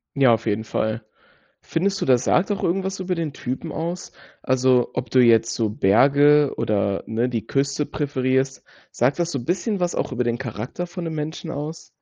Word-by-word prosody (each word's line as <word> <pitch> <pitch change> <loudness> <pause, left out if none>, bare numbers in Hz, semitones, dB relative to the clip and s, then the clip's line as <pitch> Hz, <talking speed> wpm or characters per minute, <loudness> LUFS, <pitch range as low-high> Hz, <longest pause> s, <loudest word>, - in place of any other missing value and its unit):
Ja, 135 -4 +5
auf - - -9
jeden 105 +1 0
Fall. 110 +1 -2 0.6
Findest 195 +4 -1
du, - - 0
das 130 -1 +3
sagt 195 +4 +2
auch 200 - -2
irgendwas 190 +2 -1
über 185 0 -2
den 165 -4 -2
Typen 135 +6 -5
aus? 170 +3 -4 0.3
Also, 130 -1 +2
ob 125 -2 -4
du 130 - +4
jetzt 115 -1 +4
so 110 -2 0
Berge 140 +8 +4
oder 100 -2 0
ne, 115 +3 -1
die 115 -3 -3
Küste 140 +1 0
präferierst, 135 -2 -1 0.3
sagt 135 +6 +1
das 170 0 0
so 140 - -2
'n 120 - -9
bisschen 190 +4 -1
was 175 -1 0
auch - - -2
über 125 -1 -1
den 120 0 -1
Charakter 125 - -5
von 180 0 -7
'nem 165 -1 -4
Menschen 160 +2 -5
aus? 150 +3 -6
135 Hz, 195 wpm, -22 LUFS, 120-165 Hz, 0.6 s, Ja